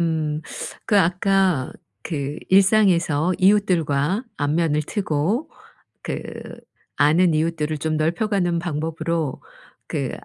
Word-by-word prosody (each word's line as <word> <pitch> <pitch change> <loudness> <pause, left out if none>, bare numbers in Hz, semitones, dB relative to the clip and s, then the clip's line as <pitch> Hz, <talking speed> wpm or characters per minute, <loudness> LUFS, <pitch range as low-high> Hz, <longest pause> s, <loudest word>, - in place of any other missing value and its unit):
음. 155 -2 -1 0.5
그 205 - +4
아까 185 -4 +2 0.3
그 145 -2 -4
일상에서 185 -5 +3
이웃들과 185 - +2
안면을 150 +1 +1
트고 195 - -1 0.5
그 - - -4 0.7
아는 160 +4 +4
이웃들을 155 -1 -1
좀 155 +1 -1
넓혀 165 +7 0
가는 175 -5 0
방법으로 160 -2 -3 0.5
그 - - -2
165 Hz, 205 characters per minute, -22 LUFS, 150-190 Hz, 0.7 s, 그